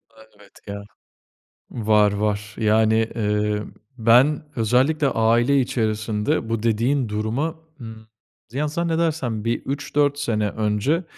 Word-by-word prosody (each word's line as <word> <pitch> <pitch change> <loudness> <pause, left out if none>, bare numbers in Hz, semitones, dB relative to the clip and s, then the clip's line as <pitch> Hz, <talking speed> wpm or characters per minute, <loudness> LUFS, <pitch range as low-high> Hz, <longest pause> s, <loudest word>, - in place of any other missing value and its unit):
A, 110 - -17 0.2
evet, 100 -1 -18 0.2
ya. 100 0 -6 0.9
Var, 105 -3 +3
var. 105 +1 -2
Yani, 110 +1 +2
eee, 105 -1 0 0.3
ben 125 +7 +4
özellikle 130 +7 +2
aile 120 +3 +2
içerisinde 110 +1 -1
bu 115 -1 -2
dediğin 115 +3 +1
duruma, 110 +10 -2 0.3
ımm, 110 -1 -10 0.4
ya, 145 +5 -1
zannedersem 160 -8 -1
bir 115 - 0
3-4 145 +1 -1
sene 105 -6 0
önce 110 - 0
115 Hz, 115 wpm, -22 LUFS, 105-140 Hz, 0.9 s, ben